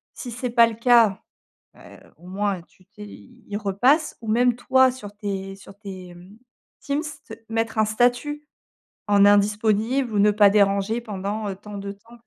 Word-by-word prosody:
Si 250 Hz, -, -8 dB
c'est 250 Hz, +1 st, -4 dB
pas 235 Hz, -1 st, +5 dB
le 225 Hz, -, -6 dB
cas, 230 Hz, -4 st, +3 dB, 0.6 s
heu, -, -, -15 dB, 0.2 s
au 175 Hz, -, -16 dB
moins, 195 Hz, -1 st, -2 dB
tu 185 Hz, +1 st, -27 dB
t'es 210 Hz, +1 st, -12 dB
il 235 Hz, -2 st, -10 dB
repasse 245 Hz, -, +1 dB
ou 225 Hz, -, -10 dB
même 245 Hz, +2 st, +2 dB
toi, 260 Hz, +1 st, +3 dB
sur 210 Hz, -5 st, -10 dB
tes 195 Hz, -2 st, -5 dB
sur 195 Hz, 0 st, -15 dB
tes, 190 Hz, -4 st, -10 dB
mmh, 185 Hz, +5 st, -16 dB, 0.4 s
Teams, 285 Hz, +2 st, -2 dB, 0.2 s
t 220 Hz, -, -10 dB
mettre 225 Hz, 0 st, -2 dB
un 215 Hz, -, +4 dB
statut 245 Hz, +7 st, 0 dB, 0.6 s
en 200 Hz, -1 st, +5 dB
«Indisponible» 215 Hz, +5 st, +2 dB
ou 205 Hz, -, +2 dB
«Ne 210 Hz, +1 st, +5 dB
pas 205 Hz, -1 st, +5 dB
déranger» 200 Hz, +2 st, +1 dB
pendant, 210 Hz, -1 st, -5 dB
heu, 190 Hz, -, -5 dB
tant 205 Hz, +1 st, -10 dB
de 200 Hz, 0 st, -6 dB
temps. 230 Hz, +4 st, -19 dB
210 Hz, 175 wpm, -23 LUFS, 200-240 Hz, 0.6 s, pas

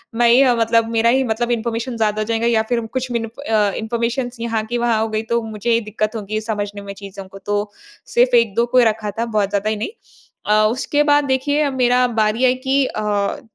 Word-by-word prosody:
मैं 235 Hz, 0 st, +4 dB
ही 255 Hz, +3 st, +6 dB
मतलब 230 Hz, 0 st, +2 dB
मेरा 230 Hz, 0 st, +3 dB
ही 265 Hz, +2 st, +3 dB
मतलब 240 Hz, +1 st, -1 dB
इन्फॉर्मेशन 235 Hz, +1 st, -2 dB
ज़्यादा 215 Hz, -1 st, 0 dB
हो -, -, -1 dB
जाएगा 230 Hz, +1 st, 0 dB
या 225 Hz, -2 st, +3 dB
फ़िर 235 Hz, -2 st, 0 dB
कुछ 255 Hz, +2 st, -4 dB
मि 235 Hz, -, 0 dB, 0.3 s
अ, 210 Hz, -2 st, +2 dB
इन्फॉर्मेशन 235 Hz, +3 st, -2 dB
यहाँ 230 Hz, -1 st, -1 dB
की 240 Hz, +2 st, -3 dB
वहाँ 235 Hz, -2 st, +1 dB
हो 225 Hz, -, 0 dB
गई। 215 Hz, 0 st, -1 dB
तो 235 Hz, -, +2 dB
मुझे 220 Hz, +1 st, -5 dB
ही 230 Hz, 0 st, +3 dB
दिक्कत 215 Hz, +1 st, -3 dB
होगी 215 Hz, 0 st, -3 dB
समझने 205 Hz, -2 st, -4 dB
में 200 Hz, 0 st, -7 dB
चीज़ों 195 Hz, -1 st, -10 dB
को, 195 Hz, +1 st, -12 dB
तो 205 Hz, +1 st, -2 dB, 0.3 s
सिर्फ 245 Hz, +1 st, +2 dB
1-2 230 Hz, 0 st, +3 dB
को 240 Hz, +1 st, 0 dB
ही 250 Hz, -, +7 dB
रखा 215 Hz, -1 st, 0 dB
था 230 Hz, +3 st, -3 dB
बहुत 210 Hz, -4 st, 0 dB
ज़्यादा 205 Hz, +1 st, -1 dB
ही 220 Hz, -, 0 dB
नहीं। 210 Hz, -, -4 dB, 0.6 s
अ, 215 Hz, +1 st, +3 dB
उसके 290 Hz, +4 st, 0 dB
बाद 290 Hz, 0 st, +3 dB
देखिए 285 Hz, +2 st, +1 dB
मेरा 250 Hz, -1 st, +2 dB, 0.2 s
बारी 215 Hz, +4 st, +1 dB
है 255 Hz, -, +5 dB
कि 275 Hz, 0 st, +3 dB
अ, 205 Hz, -3 st, -2 dB
230 Hz, 220 wpm, -19 LUFS, 215-240 Hz, 0.6 s, ही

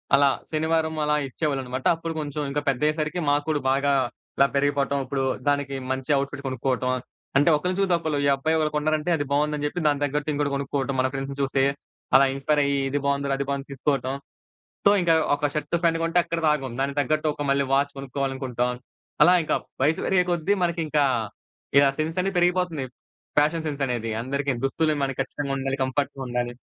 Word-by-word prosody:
అలా, 140 Hz, 0 st, +5 dB, 0.2 s
శనివారం 160 Hz, 0 st, 0 dB
అలా 150 Hz, 0 st, +2 dB
ఇచ్చేవాళ్ళనమాట. 130 Hz, -2 st, -3 dB
అప్పుడు 165 Hz, 0 st, -5 dB
కొంచెం 150 Hz, 0 st, -4 dB
ఇంకా 145 Hz, +1 st, -1 dB
పెద్దయ్యేసరికి 150 Hz, +5 st, 0 dB
మాకు 145 Hz, +1 st, +2 dB
కూడా 150 Hz, -2 st, +1 dB
బాగా 140 Hz, +1 st, +2 dB, 0.4 s
ఇలా 140 Hz, -, +5 dB
పెరిగిపోవటం, 140 Hz, 0 st, +1 dB
ఇప్పుడు 135 Hz, 0 st, -2 dB, 0.2 s
దానికి 145 Hz, -1 st, +1 dB, 0.2 s
మంచి 130 Hz, +2 st, -2 dB
అవుట్‌ఫిట్ 140 Hz, 0 st, -3 dB
కొనుక్కోవటం, 130 Hz, 0 st, -1 dB, 0.5 s
అంటే 145 Hz, +4 st, +5 dB
ఒకరిని 180 Hz, +4 st, -2 dB
చూసి 190 Hz, -2 st, +2 dB
ఒకళ్ళు. 160 Hz, -3 st, -2 dB
ఈ -, -, +4 dB
అబ్బాయి 160 Hz, +4 st, 0 dB
ఒకరు 155 Hz, -1 st, +1 dB
కొన్నారంటే, 155 Hz, +2 st, 0 dB
అది 145 Hz, -, -2 dB
బావుందని 150 Hz, +1 st, +1 dB
చెప్పి 175 Hz, +3 st, -4 dB
దానికి 145 Hz, 0 st, +1 dB
తగ్గట్టు 150 Hz, +2 st, -2 dB
ఇంకొకటి 145 Hz, -1 st, -1 dB
కొనుక్కోవటం 140 Hz, 0 st, -2 dB
మన 130 Hz, -, +3 dB
ఫ్రెండ్స్‌ని 135 Hz, +1 st, -4 dB
చూసి. 135 Hz, 0 st, +1 dB, 0.5 s
అలా 135 Hz, -, +8 dB
ఇన్‌స్పైర్ 145 Hz, +2 st, +1 dB
అయ్యి 140 Hz, 0 st, +1 dB
ఇది 145 Hz, +2 st, 0 dB
బావుందిరా, 140 Hz, 0 st, +1 dB
అది 140 Hz, -, -3 dB
బావుంది 140 Hz, 0 st, -3 dB
తీసుకోవటం. 135 Hz, -1 st, -1 dB, 0.7 s
సో, -, -, +8 dB
ఇంకా 170 Hz, -1 st, +3 dB, 0.2 s
ఒక 145 Hz, -, -2 dB
షర్ట్ 150 Hz, -, -1 dB
ప్యాంట్ 165 Hz, -1 st, +3 dB
కొంటే 165 Hz, +1 st, +2 dB
అక్కడితో 165 Hz, -1 st, -1 dB
ఆగం. 135 Hz, -5 st, -4 dB
దానికి 140 Hz, +1 st, -2 dB
తగ్గట్టు 155 Hz, +2 st, 0 dB
ఒక 145 Hz, -, -5 dB
మళ్ళీ 140 Hz, 0 st, +3 dB
వాచ్ 140 Hz, +1 st, +2 dB
కొనుక్కోవాలనుకుంటాం. 130 Hz, -2 st, -2 dB, 0.5 s
అలా 180 Hz, -, +6 dB
ఇంకా -, -, 0 dB, 0.3 s
వయసు 155 Hz, +3 st, +2 dB
పెరిగే 185 Hz, -1 st, +3 dB
కొద్దీ 175 Hz, +3 st, +1 dB
మనకి 170 Hz, -1 st, 0 dB
ఇంకా, 150 Hz, -1 st, +2 dB, 0.7 s
ఇలా 140 Hz, -1 st, +6 dB
సెన్స్ 160 Hz, +3 st, -1 dB
అనేది 195 Hz, 0 st, -2 dB
పెరిగిపోతుంది. 175 Hz, -5 st, +1 dB, 0.5 s
ఫ్యాషన్ 160 Hz, +2 st, +1 dB
సెన్స్ 145 Hz, -2 st, -4 dB
అనేది 115 Hz, -2 st, -2 dB
అందరికీ 140 Hz, +2 st, -1 dB
దుస్తులు 155 Hz, +3 st, +1 dB
మనకి 135 Hz, -1 st, -2 dB
ఖచ్చితంగుండాలి. 135 Hz, 0 st, -2 dB
కంఫర్ట్‌‌గుండాలి. 130 Hz, -3 st, -2 dB
145 Hz, 175 wpm, -25 LUFS, 135-155 Hz, 0.7 s, అలా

